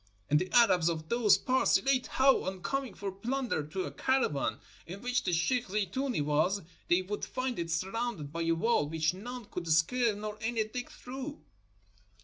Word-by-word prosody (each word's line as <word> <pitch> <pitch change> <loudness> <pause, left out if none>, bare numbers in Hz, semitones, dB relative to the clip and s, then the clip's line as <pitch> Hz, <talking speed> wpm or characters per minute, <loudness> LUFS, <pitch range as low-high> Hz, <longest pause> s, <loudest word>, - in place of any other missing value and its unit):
And 150 - +6
the 185 +2 -3
Arabs 185 -8 +5
of 160 -1 -4
those 235 -3 +5
parts 260 0 +3
relate 265 -2 +1
how, 265 0 +4
on 190 -1 -4
coming 275 -6 -2
for 200 -1 -4
plunder 240 - -2
to 160 +6 -4
a - - -5
caravan 150 - 0 0.3
in 190 +5 -8
which 250 0 0
the 180 - 0
sheikh 240 +9 +1
Zeetoonee 210 - -1
was, 155 +7 +1 0.2
they 175 +2 +3
would 205 +3 -5
find 255 -3 -3
it 170 -1 -3
surrounded 185 -2 -2
by 170 - -2
a 165 0 +2
wall 165 -4 +1
which 160 +1 +1
none 240 +5 -7
could 180 -4 -6
scale 215 +8 +3
nor 210 +1 -6
any 225 0 0
dig 245 +3 -6
through." 270 +4 -8
205 Hz, 180 wpm, -31 LUFS, 170-245 Hz, 0.3 s, And